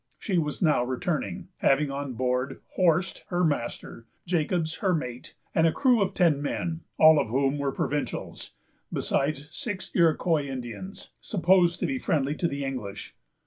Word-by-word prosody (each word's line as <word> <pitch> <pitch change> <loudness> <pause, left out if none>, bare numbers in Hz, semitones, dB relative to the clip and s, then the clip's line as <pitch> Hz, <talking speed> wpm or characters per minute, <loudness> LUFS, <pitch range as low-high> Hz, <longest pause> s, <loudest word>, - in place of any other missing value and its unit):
She 185 -4 0
was 150 +2 -2
now 150 -6 +4
returning, 130 - -3
having 140 +1 +2
on 140 -1 -4
board 125 +1 -1
Horst, 180 0 +1
her 180 0 0
master, 120 -5 -2 0.2
Jacobs, 165 -1 0
her 190 -3 +1
mate, 125 -5 -6 0.2
and 160 0 +4
a - - +3
crew 250 - +3
of 195 -1 0
ten 165 -6 +3
men, 160 +3 -2 0.2
all 155 -1 +7
of - - 0
whom 135 +4 +1
were 140 -1 0
provincials, 145 +2 -3 0.4
besides 145 +1 -1
six 190 +1 -5
Iroquois 165 -3 +2
Indians, 135 - -7
supposed 175 -2 +3
to - - +2
be 135 -5 -1
friendly 145 0 0
to 170 - +1
the 140 -2 -3
English. 105 -7 -6
150 Hz, 155 wpm, -27 LUFS, 135-175 Hz, 0.4 s, all